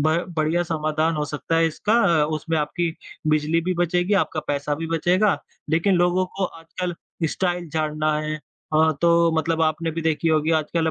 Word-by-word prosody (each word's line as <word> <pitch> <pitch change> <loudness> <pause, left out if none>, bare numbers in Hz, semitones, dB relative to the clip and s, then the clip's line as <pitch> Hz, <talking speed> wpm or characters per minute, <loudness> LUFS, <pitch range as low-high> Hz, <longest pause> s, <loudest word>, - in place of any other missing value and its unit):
ब 155 +2 +2 0.2
बढ़िया 160 +3 +1
समाधान 155 -1 0
हो 150 - 0
सकता 150 +2 -2
है 165 - +4
इसका। 205 +7 -1 0.4
उसमें 160 +2 -2
आपकी 170 +3 -1 0.4
बिजली 155 +2 +2
भी 185 0 0
बचेगी, 175 +3 +1
आपका 160 -5 +1
पैसा 145 0 -1
भी 165 +2 -4
बचेगा, 175 +5 +2 0.4
लेकिन 170 +5 +3
लोगों 175 +1 +2
को 195 - 0
आजकल 175 +1 -5 0.3
स्टाइल 175 -2 -2
झाड़ना 155 0 0
है। 155 0 -3
अ, 155 +1 0
तो 170 0 +4
मतलब 160 +1 0
आपने 160 +1 0
भी 165 +1 -4
देखी 160 0 +1
होगी 155 0 +2
आजकल 160 +1 -1
165 Hz, 170 wpm, -23 LUFS, 155-175 Hz, 0.4 s, है